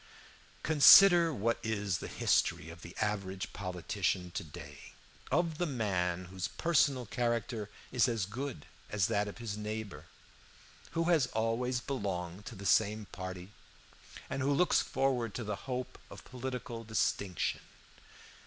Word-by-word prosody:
"Consider 170 +3 +8
what 115 -3 0
is 105 -5 -1
the - - -6
history 80 - +1
of 85 0 -12
the 85 - -10
average 95 -3 -2
politician 90 -1 -2
to 95 - -4
day, 75 -2 -11 0.4
of 160 +1 +1
the 175 - +1
man 90 - -1
whose 95 0 -4
personal 140 -6 +2
character 120 -2 -2 0.2
is 120 -5 +3
as 115 -6 0
good 125 - -6 0.2
as 105 -4 +1
that 105 +3 0
of 100 - -7
his 115 -3 -4
neighbor, 105 0 -5 0.9
who 165 - +3
has 165 -6 +3
always 120 +3 -1
belonged 100 -7 -4
to 115 - -7
the 100 0 -9
same 105 +1 +3
party, 95 +1 -7 0.8
and 135 - -3
who 135 +2 +1
looks 175 +6 +3
forward 130 -5 -1
to 120 - -3
the 105 -1 -3
hope 125 0 -4
of - - -11
political 125 -2 -5
distinction. 100 -4 -1
110 Hz, 140 wpm, -32 LUFS, 95-130 Hz, 0.9 s, Consider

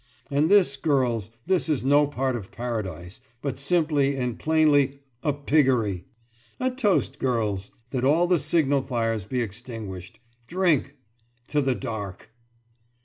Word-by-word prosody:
And 145 +3 +2
this, 185 -9 +4
girls, 125 - +1 0.2
this 185 -2 +1
is 150 -5 0
no 145 +2 +4
part 135 -2 -1
of 100 -5 -7
paradise, 105 -5 -5 0.2
but 140 -2 -3
simply 145 -3 +2
and 125 -3 -3
plainly 145 -3 +3 0.2
a 150 - +1
piggery! 130 - +1 0.5
A 255 0 +1
toast, 245 -7 0
girls! 105 -6 -1 0.2
That 125 -2 -2
all 155 +6 +4
the 175 -1 +3
signal 145 -3 +2
fires 115 -6 -1
be 125 +3 -1
extinguished. 105 -5 -7 0.3
Drink! 170 -5 +1 0.5
To 150 - +2
the 135 -2 +1
Dark! 110 -7 -6
135 Hz, 135 wpm, -25 LUFS, 115-150 Hz, 0.5 s, this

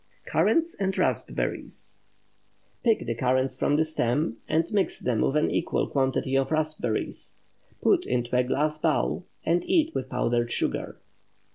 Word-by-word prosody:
CURRANTS 330 0 +2
AND 195 -1 0
RASPBERRIES. - - -1 0.8
Pick 225 -3 +2
the - - -1
currants 130 +2 +1
from 145 +2 +1
the 160 +1 +3
stems, 150 -3 0
and 160 +1 +2
mix 200 -2 0
with 125 +3 +1
an 150 - +2
equal - - 0
quantity 135 -1 0
of 135 0 +2
raspberries. 155 -8 -1 0.5
Put - - +3
into 120 0 -1
a 125 - +4
glass 150 +4 0
bowl, 160 +3 0 0.2
and 170 +2 +2
eat 325 -3 +2
with - - -3
powdered 120 0 0
sugar. - - -1
145 Hz, 140 wpm, -26 LUFS, 125-165 Hz, 0.8 s, a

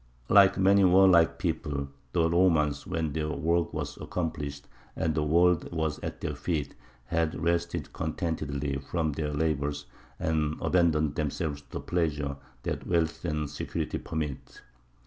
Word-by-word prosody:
Like 100 -2 +6
many 100 +1 +5
warlike 90 -2 +6
peoples, 75 -5 -2 0.2
the 85 -2 +3
Romans, 80 -4 +2
when 80 -5 -2
their 75 0 -1
work 85 +2 0
was - - -4
accomplished 75 -5 -4 0.3
and 80 -1 0
the 75 - 0
world 85 +2 +3
was 80 -3 -1
at - - -6
their 75 - -2
feet, 75 -1 -2 0.3
had 80 +3 0
rested 85 +1 -1
contentedly 75 -4 -2
from 80 +3 -1
their 75 +1 -2
labours, 75 -1 -1 0.3
and 75 -1 0
abandoned 80 -4 +2
themselves 75 0 -2
to 70 - -29
the - - -3
pleasures 75 -5 -1 0.3
that - - -3
wealth 85 -2 0
and 75 -2 -1
security 75 +1 -3
permit. 80 -4 -5
80 Hz, 140 wpm, -28 LUFS, 75-85 Hz, 0.3 s, Like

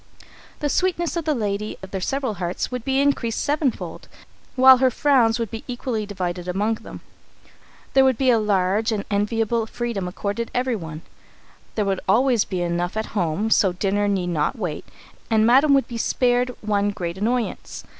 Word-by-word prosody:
The 295 - +1
sweetness 345 0 0
of 335 -2 -2
the 305 -2 +1
lady 210 -2 -3
of 190 - -9
their 190 - -3
several 270 +2 -1
hearts 175 +7 -2
would 250 -2 -4
be 270 +1 +1
increased 275 -5 +1
seven 295 -1 +1
fold, - - -8 0.5
while 260 0 +8
her 260 0 +3
frowns 245 -4 +3
would 230 -4 -3
be 225 - -6
equally 240 -4 -3
divided 180 -3 -4
among 205 +5 0
them. - - -10 0.9
There 270 - +6
would 260 -3 +3
be 260 -2 +3
a 230 - +4
large 205 +2 +1
and 210 -2 -2
enviable 225 +2 0
freedom 230 -6 -3
accorded 205 +5 -3
everyone. 200 -12 -2 0.7
There 210 - 0
would 195 -1 0
always 240 +1 +3
be 180 -2 -3
enough 175 +3 -2
at 220 - -4
home 200 +2 -1
so 190 -4 +4
dinner 205 +2 0
need 190 -3 0
not 155 - 0
wait, 175 -8 -4 0.4
and 220 -1 +3
Madam 275 +5 +5
would 270 - +2
be 235 -2 -6
spared 245 +1 +1
one 205 -1 +1
great 175 -2 -5
annoyance. 235 +3 -2
220 Hz, 175 wpm, -22 LUFS, 195-250 Hz, 0.9 s, while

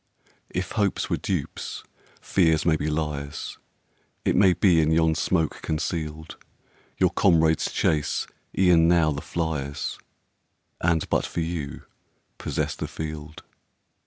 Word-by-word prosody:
If 90 0 -3
hopes 100 -3 0
were - - +2
dupes, - - -4 0.4
fears 80 -5 +2
may 80 -2 +4
be 75 0 -1
liars; 75 -2 -3 0.7
It - - +2
may 95 -1 +6
be, 90 -2 +4
in 80 - +2
yon 80 0 +4
smoke 80 -1 0
conceal'd, 80 0 -3 0.6
Your - - +3
comrades 80 -1 +3
chase 75 -2 +1 0.3
e'en 90 -3 +5
now 85 -3 +4
the 70 0 -4
fliers, 75 -4 -3 0.8
And, 80 -1 +1
but - - +2
for 85 - -3
you, 80 -4 -4 0.6
possess - - -2
the - - -4
field. 75 0 -7
80 Hz, 125 wpm, -25 LUFS, 75-85 Hz, 0.8 s, may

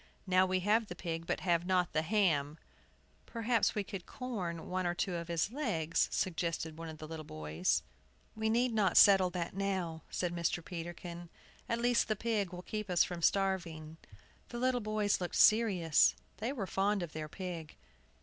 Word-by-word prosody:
Now 185 0 +4
we 185 0 0
have 215 +3 +2
the 175 - -7
pig, 165 -1 -4
but - - -1
have 170 -2 +2
not 180 -1 +1
the 155 - +2
ham!" 160 -6 +1 0.7
"Perhaps 230 0 +1
we 210 - 0
could 195 -2 -7
'corn' 185 -10 -5
one 185 -1 -1
or 175 - -1
two 180 +1 -1
of 170 -1 -4
his 170 +4 0
legs," 185 - 0
suggested 165 -3 -2
one 165 0 -7
of 160 - -8
the 155 - -8
little 160 0 -6
boys. 75 - -1 0.5
"We 220 0 0
need 240 +2 +2
not 205 -4 +2
settle 195 -3 +7
that 175 -1 -4
now," 190 -5 -2
said 175 -1 -2
Mr. 170 0 -1
Peterkin. 175 0 -7 0.4
"At 230 0 0
least 240 0 +2
the 215 - 0
pig 210 -4 -1
will 180 0 -8
keep 215 0 -5
us 175 -1 +4
from 175 -1 -5
starving." 170 -5 0 0.5
The 240 - -6
little 250 0 +1
boys 215 -2 0
looked 175 - -3
serious; 195 -8 +5 0.2
they 225 +4 -2
were 235 -8 -3
fond 195 +1 0
of 165 - -7
their 155 -1 -5
pig. 170 -3 -6
180 Hz, 180 wpm, -33 LUFS, 165-210 Hz, 0.7 s, settle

